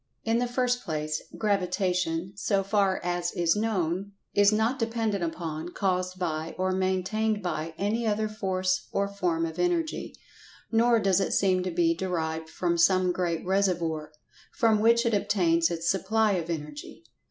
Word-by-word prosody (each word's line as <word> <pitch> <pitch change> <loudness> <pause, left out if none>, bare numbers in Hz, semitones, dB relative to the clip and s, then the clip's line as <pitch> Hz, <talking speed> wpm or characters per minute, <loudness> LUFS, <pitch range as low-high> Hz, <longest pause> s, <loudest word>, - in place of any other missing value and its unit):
In 225 +1 +1
the 245 - 0
first 245 0 0
place, 155 -1 -2 0.2
Gravitation, 185 -3 0
so 195 0 0
far 195 -1 +1
as 175 0 -1
is 170 -1 +2
known, 200 -3 -1 0.2
is 205 0 +5
not 220 +5 +1
dependent 225 -4 -1
upon, 165 -1 -4
caused 185 -1 -1
by, 160 -3 -3
or 185 0 0
maintained 190 +3 0
by, 160 -2 -3
any 220 +3 0
other 215 0 +1
Force 185 -3 -1
or 200 0 0
form 180 -5 -1
of 160 -1 -6
Energy. 340 -3 -1 0.6
Nor 230 +1 +4
does 195 -3 +3
it 195 - 0
seem 185 -2 +2
to 185 - -2
be 170 -1 +2
derived 160 -3 -3
from 170 0 -1
some 185 +1 +4
great 175 -2 -2
reservoir, 170 -5 0 0.4
from 220 -2 +2
which 235 +2 +4
it 230 - +1
obtains 170 -5 +2
its 170 -1 -3
supply 210 +4 +2
of 175 -4 -2
Energy. 150 0 -6
185 Hz, 155 wpm, -27 LUFS, 170-210 Hz, 0.6 s, is